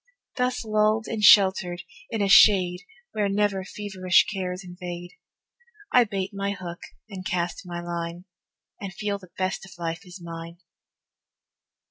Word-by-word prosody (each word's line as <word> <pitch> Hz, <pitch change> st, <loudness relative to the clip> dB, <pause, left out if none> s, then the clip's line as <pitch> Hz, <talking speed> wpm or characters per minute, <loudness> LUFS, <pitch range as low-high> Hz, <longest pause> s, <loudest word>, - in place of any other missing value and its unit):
Thus 250 Hz, -2 st, -1 dB
lulled 215 Hz, +1 st, +2 dB
and 220 Hz, -2 st, -3 dB
sheltered 190 Hz, -4 st, +5 dB, 0.3 s
in 215 Hz, -, -1 dB
a -, -, +2 dB
shade 185 Hz, -3 st, +6 dB, 0.3 s
Where 205 Hz, -2 st, 0 dB
never 200 Hz, -1 st, +1 dB
feverish 190 Hz, -2 st, +1 dB
cares 185 Hz, -2 st, -4 dB
invade, 175 Hz, -1 st, -8 dB, 0.8 s
I 245 Hz, -1 st, +6 dB
bait 195 Hz, -3 st, -3 dB
my 200 Hz, 0 st, -2 dB
hook 175 Hz, -3 st, -7 dB, 0.3 s
and 195 Hz, -3 st, -8 dB
cast 180 Hz, 0 st, -3 dB
my 175 Hz, -1 st, -5 dB
line, 170 Hz, 0 st, -5 dB, 0.5 s
And 200 Hz, -2 st, -6 dB
feel 200 Hz, +1 st, -3 dB
the 185 Hz, -2 st, -15 dB
best 185 Hz, 0 st, -2 dB
of 195 Hz, -, -12 dB
life 165 Hz, 0 st, -4 dB
is 180 Hz, +2 st, -10 dB
mine. 170 Hz, 0 st, -8 dB
190 Hz, 140 wpm, -25 LUFS, 175-205 Hz, 0.8 s, shade